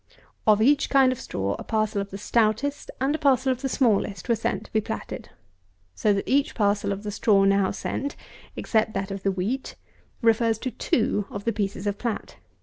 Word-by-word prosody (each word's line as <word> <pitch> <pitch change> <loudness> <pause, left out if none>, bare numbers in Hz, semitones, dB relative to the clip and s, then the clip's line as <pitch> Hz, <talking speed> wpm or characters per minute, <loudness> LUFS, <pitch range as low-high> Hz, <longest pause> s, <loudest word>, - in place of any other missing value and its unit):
Of 215 0 +5
each 285 +4 +3
kind 270 -2 +5
of 255 - -4
straw 100 +1 -2
a - - -6
parcel 215 -2 0
of 200 - -6
the 195 - -7
stoutest 230 +7 0
and 270 +3 +1
a 315 - -2
parcel 265 -2 +3
of 255 0 -3
the 270 - -1
smallest 220 -6 +1
were 235 - +3
sent 225 - -2
to - - -18
be 220 - +3
platted; - - -6 0.6
so 210 - +1
that 200 -1 -1
each 285 +3 +2
parcel 205 -2 +1
of 200 +1 -4
the 210 - -4
straw 200 -1 +3
now 195 -1 +3
sent, 280 +1 -3 0.4
except 220 -1 0
that 195 0 -2
of 195 0 -5
the 195 - +1
wheat, 205 +9 -3 0.5
refers 225 -1 +3
to 255 +3 -4
two 210 -4 0
of 200 - -6
the 230 - +1
pieces 200 -1 -3
of 205 0 -2
plat. 235 -3 -4
215 Hz, 205 wpm, -25 LUFS, 200-255 Hz, 0.6 s, Of